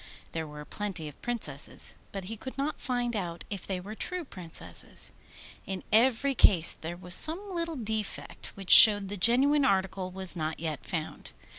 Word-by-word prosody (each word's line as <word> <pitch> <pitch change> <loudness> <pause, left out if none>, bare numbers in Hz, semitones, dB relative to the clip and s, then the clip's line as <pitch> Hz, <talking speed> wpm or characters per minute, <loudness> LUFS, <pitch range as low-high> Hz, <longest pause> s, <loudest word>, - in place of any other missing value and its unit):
There 160 -1 -4
were 150 0 -10
plenty 190 -6 -6
of 145 - -13
Princesses, 180 - +2 0.2
but 195 -1 -6
he 215 +5 -6
could 260 +5 -9
not 280 +3 -3
find 245 -2 -2
out 175 -4 -5
if 200 -3 -6
they 190 -2 -3
were 200 +4 -9
true 360 +9 -5
Princesses. 180 - -4 0.6
In 190 -1 -5
every 255 +4 +3
case 175 -9 +5
there 170 +2 -7
was 180 0 -5
some 370 - -1
little 335 -2 -3
defect, 220 -4 -5
which 195 -2 -5
showed 205 -3 +9
the 205 - -4
genuine 265 +9 +3
article 190 -3 0
was 185 0 +4
not 155 -1 -4
yet 160 -2 -5
found. 160 -3 -6
200 Hz, 170 wpm, -28 LUFS, 175-245 Hz, 0.6 s, showed